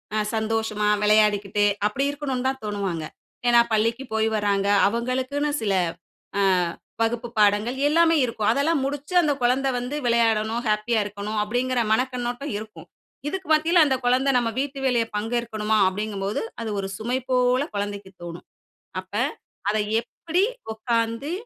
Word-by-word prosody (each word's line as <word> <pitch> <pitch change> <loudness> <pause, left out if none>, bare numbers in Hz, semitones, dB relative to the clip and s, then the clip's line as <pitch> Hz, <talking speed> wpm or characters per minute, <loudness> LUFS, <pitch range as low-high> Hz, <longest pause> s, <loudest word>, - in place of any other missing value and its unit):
அ - - +1 0.2
சந்தோஷமா, 220 -1 0
விளையாடிக்கிட்டு, 210 -1 +3 0.2
அப்படி 265 +6 -2
இருக்கணும்னு 270 -3 -3
தான் 265 -2 -5
தோணுவாங்க. 195 -6 -3 0.4
ஏன்னா, 240 -1 +7
பள்ளிக்கு 230 +4 +1
போய் 220 0 +2
வர்றாங்க. 200 -1 +1 0.2
அவங்களுக்குன்னு 255 +6 -1
சில 200 -3 0 0.7
அ - - +3 0.6
வகுப்பு 230 +1 0
பாடங்கள், 210 +4 +3
எல்லாமே 330 +2 +4
இருக்கும், 220 -3 -2
அதெல்லாம் 295 +3 +1
முடிச்சு, 290 +4 -4
அந்த 300 -3 +2
குழந்தை 255 +3 +2
வந்து 250 +4 -3
விளையாடணும், 230 -1 +2
ஹேப்பியா 215 +2 +1
இருக்கணும். 205 +1 -5
அப்படிங்கிற 245 +3 -1
மனக்கண்ணோட்டம் 250 +3 -1
இருக்கும். 215 0 -10 0.4
இதுக்கு 375 +4 -4
மத்தியில 325 +2 +5
அந்த 270 -3 +2
குழந்தை 260 +3 +3
"நம்ம 230 -2 0
வீட்டு 275 0 -3
வேலைய 240 -3 +2
பங்கேற்கணுமா? 220 -1 -1
"அப்படிங்கும்போது, 200 0 -2 0.2
அது 225 - -3
ஒரு 195 - -3
சுமை 245 +4 -1
போல 250 +1 +3
குழந்தைக்கு 200 -1 -4
தோணும். 170 0 -8 0.6
அப்ப 185 +1 -23 0.6
அத 210 - 0 0.3
எப்படி 340 +8 -2 0.3
உக்காந்து, 230 +5 -1
230 Hz, 135 wpm, -24 LUFS, 210-260 Hz, 0.7 s, ஏன்னா